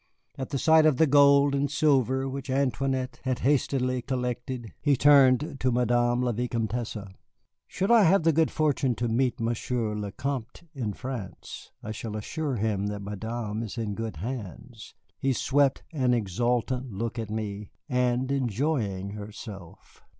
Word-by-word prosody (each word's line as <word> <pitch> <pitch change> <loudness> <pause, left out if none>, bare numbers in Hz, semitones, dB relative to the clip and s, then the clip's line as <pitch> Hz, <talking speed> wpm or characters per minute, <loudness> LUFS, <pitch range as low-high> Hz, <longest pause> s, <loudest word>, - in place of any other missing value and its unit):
At 130 - -5
the 140 - -2
sight 160 +2 +5
of 150 -5 +3
the 160 - +5
gold 140 -1 +5
and 140 0 +1
silver 135 -3 +2
which 135 +1 -6
Antoinette 130 -1 -1
had 130 -1 0
hastily 130 -2 +1
collected, 125 -2 -4
he 145 -3 +3
turned 140 +1 +5
to 130 - +1
Madame 120 0 +2
la 125 - +1
Vicomtesse. 115 0 -2 0.7
"Should 195 +4 -1
I 235 -2 +7
have 180 +1 +4
the 165 0 +4
good 160 +1 +3
fortune 140 -5 +1
to 120 - -1
meet 120 +2 0
Monsieur 115 -1 -1
le 105 -1 -3
Vicomte 130 - -5
in 120 -8 -3
France, 110 -7 -7
I 110 - -5
shall 110 0 -5
assure 145 +6 -3
him 105 -2 -1
that 105 -1 -4
Madame 110 +2 -4
is 115 0 -6
in 110 -3 -2
good 110 -1 -4
hands" 115 +3 -7 0.2
(he 135 0 +1
swept 140 +2 +2
an 130 -5 +2
exultant 120 +4 -1
look 115 +4 -4
at 110 -2 -4
me) 105 -1 -4 0.2
"and 125 -1 +1
enjoying 120 -6 -1
herself." 105 -3 -10
125 Hz, 155 wpm, -27 LUFS, 110-135 Hz, 0.7 s, I